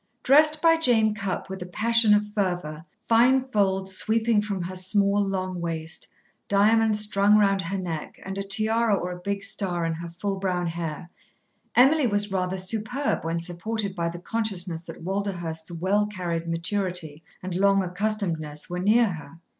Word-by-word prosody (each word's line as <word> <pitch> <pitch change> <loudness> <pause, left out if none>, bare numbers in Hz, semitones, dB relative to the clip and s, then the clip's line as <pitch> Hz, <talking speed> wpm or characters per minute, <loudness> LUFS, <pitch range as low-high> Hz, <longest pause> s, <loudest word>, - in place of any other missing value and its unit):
Dressed 305 +3 +4
by 330 0 +6
Jane 225 -8 +3
Cupp 200 -3 -4
with 190 0 -7
a 180 - -5
passion 225 +2 +3
of 210 0 0
fervour, 175 -6 -2 0.2
fine 255 +3 +3
folds 190 -4 +1
sweeping 220 +1 +2
from 200 -3 -3
her 185 +2 -6
small, 200 +2 +2
long 185 -2 -3
waist, 160 -1 -3 0.4
diamonds 215 +2 +3
strung 210 0 +3
round 195 -2 +3
her 190 +3 -3
neck, 170 -5 -5
and 190 0 -5
a 195 - -3
tiara 220 +2 +2
or 180 -2 -3
a 180 - -7
big 200 +2 -3
star 180 -4 -2
in 165 - -1
her 170 +1 -7
full 195 +3 -4
brown 180 -2 -1
hair, 170 0 -5 0.6
Emily 270 +2 +5
was 205 -1 0
rather 185 0 -1
superb 225 +8 -1
when 165 +1 -2
supported 195 +4 -4
by 170 -2 -1
the 170 - -7
consciousness 185 -4 -1
that 165 -1 -11
Walderhurst's 175 -4 -4
well 190 +5 0
carried 175 -5 -4
maturity 170 -2 -2 0.2
and 185 -1 -4
long 195 +1 +3
accustomedness 180 -6 -3
were 180 - -3
near 215 +6 +4
her. 165 -1 -8
195 Hz, 165 wpm, -25 LUFS, 175-210 Hz, 0.6 s, by